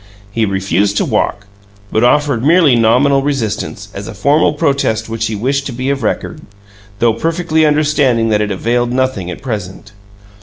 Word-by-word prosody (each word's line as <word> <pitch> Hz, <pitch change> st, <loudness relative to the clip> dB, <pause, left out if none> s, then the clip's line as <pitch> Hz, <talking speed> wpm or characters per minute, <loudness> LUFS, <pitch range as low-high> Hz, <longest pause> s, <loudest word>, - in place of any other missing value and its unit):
He 110 Hz, 0 st, 0 dB
refused 100 Hz, +1 st, 0 dB
to -, -, +1 dB
walk, 100 Hz, 0 st, -1 dB, 0.5 s
but 110 Hz, -, +1 dB
offered 140 Hz, -1 st, +2 dB
merely 155 Hz, -3 st, +4 dB
nominal 125 Hz, +5 st, +3 dB
resistance, 135 Hz, -7 st, -3 dB
as 100 Hz, +1 st, -7 dB
a 110 Hz, -, -8 dB
formal 145 Hz, +10 st, +2 dB
protest 135 Hz, -7 st, 0 dB
which 115 Hz, 0 st, -2 dB
he 110 Hz, -, -3 dB
wished 135 Hz, +6 st, -1 dB
to -, -, -5 dB
be 130 Hz, +3 st, -2 dB
of 140 Hz, -1 st, -2 dB
record, -, -, -3 dB, 0.6 s
though 115 Hz, +1 st, +2 dB
perfectly 160 Hz, +4 st, 0 dB
understanding 145 Hz, -6 st, +2 dB
that 105 Hz, -1 st, +2 dB
it 105 Hz, -, -1 dB
availed 120 Hz, +5 st, -1 dB
nothing 130 Hz, -8 st, -1 dB
at 90 Hz, -, -8 dB
present. 105 Hz, -5 st, -6 dB
120 Hz, 165 wpm, -15 LUFS, 105-140 Hz, 0.6 s, merely